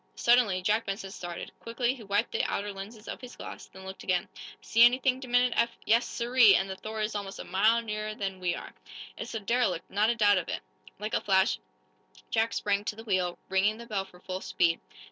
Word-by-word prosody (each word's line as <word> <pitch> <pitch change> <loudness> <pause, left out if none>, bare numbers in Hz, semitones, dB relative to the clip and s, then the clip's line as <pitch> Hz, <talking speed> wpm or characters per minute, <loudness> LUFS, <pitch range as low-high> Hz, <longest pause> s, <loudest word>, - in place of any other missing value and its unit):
Suddenly, 235 -7 +3
Jack 215 +4 +1
Benson 195 0 -4
started. 175 -2 -6
Quickly 240 +2 -1
he 260 - -11
wiped 205 +2 0
the - - 0
outer 205 0 -2
lenses 210 +3 -9
of - - -6
his 250 -1 -9
glass, - - -9
then 190 0 -13
looked 190 0 -8
again. 180 -1 0 0.3
"See 230 - +4
anything?" 255 +1 +4
demanded 245 -1 +2
Eph. 235 - +1
"Yes, 230 +2 +3
sirree! 235 -3 +5
And 190 - +1
the 190 - -5
'Thor' 215 +3 -5
is 215 +1 -1
almost 200 -2 -5
a - - -6
mile 215 +5 +3
nearer 215 -1 -4
than 195 -2 -4
we 175 -1 0
are! - - -9 0.4
It's - - -6
the 225 - -2
derelict 200 -5 0
not 210 +3 +3
a 235 - +2
doubt 205 -3 +5
of 170 - -6
it!" - - -3 0.4
Like 210 +2 -5
a - - +2
flash 190 +2 +3 0.7
Jack 225 0 +1
sprang 205 0 0
to 210 - -2
the 225 - -9
wheel, 185 -5 0
ringing 195 +3 +2
the 235 - -9
bell 205 -4 -2
for 180 -2 -17
full 185 +1 -5
speed. 170 -2 +1
210 Hz, 220 wpm, -29 LUFS, 190-230 Hz, 0.7 s, sirree